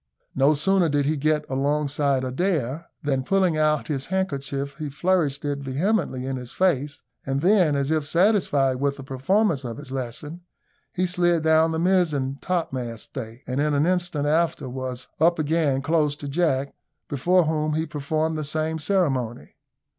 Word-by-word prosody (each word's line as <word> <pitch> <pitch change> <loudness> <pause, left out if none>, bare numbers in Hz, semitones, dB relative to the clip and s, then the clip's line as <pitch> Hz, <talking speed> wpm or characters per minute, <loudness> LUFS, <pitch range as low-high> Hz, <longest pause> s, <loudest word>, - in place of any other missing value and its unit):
No 140 +3 +3
sooner 180 +3 +3
did 145 -1 +1
he 155 +2 +1
get 150 +1 +1
alongside 140 0 0
Adair, 150 +1 -1 0.2
than, 135 -3 0
pulling 185 +1 +2
out 155 -1 +1
his 140 -3 -2
handkerchief, 140 -6 -3
he 150 -2 -3
flourished 150 -2 0
it 145 -1 -1
vehemently 140 0 -1
in 135 0 -3
his 125 -1 -7
face; 145 -6 0 0.2
and 135 +1 -2
then, 180 -4 +4
as 140 +1 0
if 155 -2 0
satisfied 165 -7 +2
with 140 +1 -1
the 135 - -8
performance 140 +4 +1
of 120 -2 -5
his 145 -3 -10
lesson, 135 +6 -5 0.5
he 185 0 0
slid 175 -2 +2
down 160 0 +4
the 160 - -1
mizen 160 -7 +1
topmast 130 -10 -3
stay, 120 -1 -7
and 130 +2 -1
in 150 0 +1
an 145 +2 +2
instant 175 -5 0
after 160 -2 +1
was 130 0 -5
up 170 +2 +4
again 150 -3 +1
close 155 -3 +1
to 145 -1 -7
Jack, 140 -3 0 0.3
before 175 +6 +2
whom 155 -1 0
he 160 +1 0
performed 155 +1 -2
the - - -2
same 155 +2 -1
ceremony. 140 - -1
150 Hz, 165 wpm, -24 LUFS, 135-165 Hz, 0.5 s, then